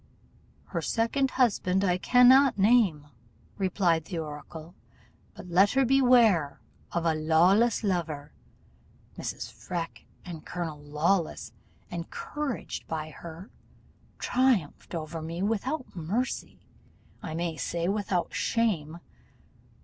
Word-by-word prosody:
'Her - - -2
second 255 +4 0
husband 200 -7 +1
I 180 -2 +1
cannot 255 +4 +6
name,' 195 -8 +3 0.5
replied 175 -4 +1
the 175 - -5
oracle, 155 +2 -7 0.6
'but - - -10
let 190 +4 +4
her 270 0 +3
beware 240 - +4 0.3
of 170 -1 -1
a 165 - +3
Lawless 175 +10 +3
lover.' 160 -7 -2 0.8
Mrs. - - -5
Freke 170 -2 -6 0.2
and 170 -4 -8
Colonel 170 -4 -5
Lawless, 155 +4 -1 0.4
encouraged 225 - -5
by 155 -1 -4
her, 170 +6 -10 0.7
triumphed 245 - 0
over 160 0 -5
me 165 +3 -4
without 250 +7 -2
mercy 200 +10 -3 0.6
I 160 - -5
may 170 -1 -2
say, 170 +2 -2
without 195 -3 -1
shame! 170 -9 0
180 Hz, 105 wpm, -28 LUFS, 160-230 Hz, 0.8 s, cannot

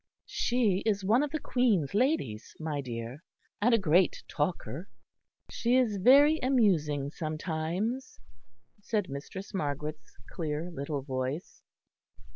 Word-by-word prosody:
"She 230 -6 +1
is 205 -3 0
one 225 +7 +4
of 295 - 0
the 310 +2 -2
Queen's 225 - +1
ladies, 205 - 0
my 155 -3 -2
dear; 120 +2 -6 0.4
and 240 +4 +4
a 230 - +6
great 180 -2 +3
talker." 150 - -3 0.6
"She 240 +1 +1
is 240 -6 +3
very 285 +9 +6
amusing 165 - +2
sometimes," 165 - -3 0.6
said 205 -3 -1
Mistress 165 +9 -7
Margaret's 150 +1 -4
clear 160 +1 -3
little 140 -2 -4
voice. 130 +4 -4
180 Hz, 115 wpm, -30 LUFS, 145-230 Hz, 0.6 s, a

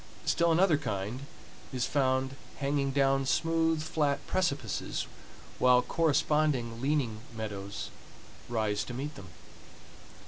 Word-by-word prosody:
Still 170 0 +3
another 165 -2 +4
kind 120 +1 -3 0.4
is 125 -2 0
found 130 -1 +1 0.2
hanging 140 0 0
down 135 0 +2
smooth, 165 +1 +2
flat 145 -3 0
precipices, 175 -6 -1 0.5
while 125 -1 +6
corresponding 150 -7 +1
leaning 135 -6 0 0.2
meadows 100 -2 -5 0.6
rise 105 -3 0
to 125 - -6
meet 145 +4 -4
them. 100 -7 -10
135 Hz, 105 wpm, -30 LUFS, 120-150 Hz, 0.6 s, while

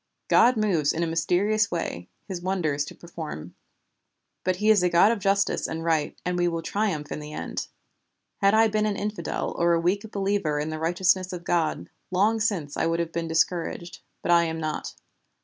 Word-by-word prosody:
'God 245 0 +5
moves 180 -9 +2
in 170 - -1
a - - +2
mysterious 180 +7 +1
way 90 - -4 0.2
His 185 -3 -5
wonders 165 -6 0
to - - -10
perform,' 155 - -8 0.9
but 185 0 +1
He 210 +4 +3
is 210 -4 +5
a 180 - +3
God 175 +5 +5
of 230 - -1
Justice 195 0 +1
and 160 0 -4
Right, 160 -3 0
and 180 0 -1
we 175 - +3
will 165 -1 -2
triumph 190 -9 -2
in - - -3
the 150 0 -8
end. - - -4 0.7
Had 200 +1 +3
I 225 0 +6
been 215 0 +1
an 205 -1 -1
infidel 210 0 -3
or 170 0 +3
a 170 - +3
weak 200 +6 0
believer 195 -7 0
in 150 +1 -2
the 155 - -4
righteousness 185 +3 +1
of 175 -1 -6
God, 165 -3 0 0.2
long 205 +5 +2
since 185 -10 -1
I - - 0
would 165 0 0
have 170 -1 -2
been 165 0 -3
discouraged, 170 +1 -1 0.2
but - - +1
I 170 0 +5
am 160 0 -3
not. 155 -1 -4
175 Hz, 200 wpm, -26 LUFS, 160-200 Hz, 0.9 s, I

